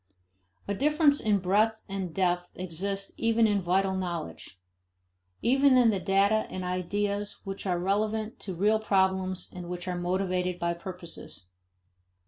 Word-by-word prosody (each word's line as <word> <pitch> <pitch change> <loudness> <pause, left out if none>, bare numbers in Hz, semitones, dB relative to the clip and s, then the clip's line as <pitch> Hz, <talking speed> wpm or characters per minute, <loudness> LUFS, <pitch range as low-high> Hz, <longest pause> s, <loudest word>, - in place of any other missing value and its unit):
A 200 - 0
difference 295 - +3
in 210 -2 +2
breadth 210 +4 +1
and 195 -3 -4
depth 180 0 -1
exists 195 +3 -3
even 230 0 +3
in 205 -2 +2
vital 190 +2 +1
knowledge; 170 - -5 0.8
even 270 +1 +5
in 240 -3 +5
the 200 - -1
data 200 +3 +2
and 185 - -5
ideas 200 +3 -2
which 195 0 -5
are 180 -1 +1
relevant 215 +4 -1
to 190 -3 -5
real 210 +5 +3
problems 190 -3 0
and 180 -1 -7
which 180 0 -5
are 180 - -1
motivated 180 0 -1
by 170 0 0
purposes. 170 - -8
195 Hz, 140 wpm, -28 LUFS, 180-210 Hz, 0.8 s, even